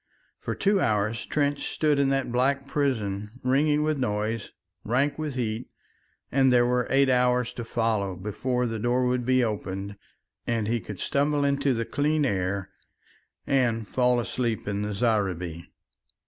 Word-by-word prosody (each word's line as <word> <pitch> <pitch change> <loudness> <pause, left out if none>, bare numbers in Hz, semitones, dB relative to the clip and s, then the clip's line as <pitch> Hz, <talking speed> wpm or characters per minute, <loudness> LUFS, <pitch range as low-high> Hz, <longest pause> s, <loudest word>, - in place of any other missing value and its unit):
For - - -4
two 200 0 +2
hours 110 - 0
Trench 145 -1 0
stood 150 -2 +1
in 140 -1 +3
that 135 -2 0
black 135 +3 +1
prison 110 -6 -2
ringing 145 +4 +2
with 155 -2 0
noise, 110 -2 -1 0.3
rank 135 +7 0
with 150 -4 -3
heat, 115 -1 -3 0.6
and 135 -1 +4
there 120 -1 +5
were 125 0 +1
eight 135 +1 +4
hours 125 -1 +2
to 120 - -5
follow 110 -4 -1
before 125 +6 -2
the 115 -2 -3
door 120 +3 +1
would 125 -1 0
be 130 -1 +4
opened 100 -2 -3 0.5
and 115 -3 0
he 120 +1 +1
could 105 -3 -8
stumble 145 +1 +1
into 140 -1 +1
the 115 0 -1
clean 150 +3 +1
air 95 -3 -1 0.7
and 120 -5 +1
fall 125 -1 +2
asleep 115 -2 -2
in 100 0 -1
the 105 0 -3
zareeba. 95 -7 -1
125 Hz, 155 wpm, -26 LUFS, 105-135 Hz, 0.7 s, there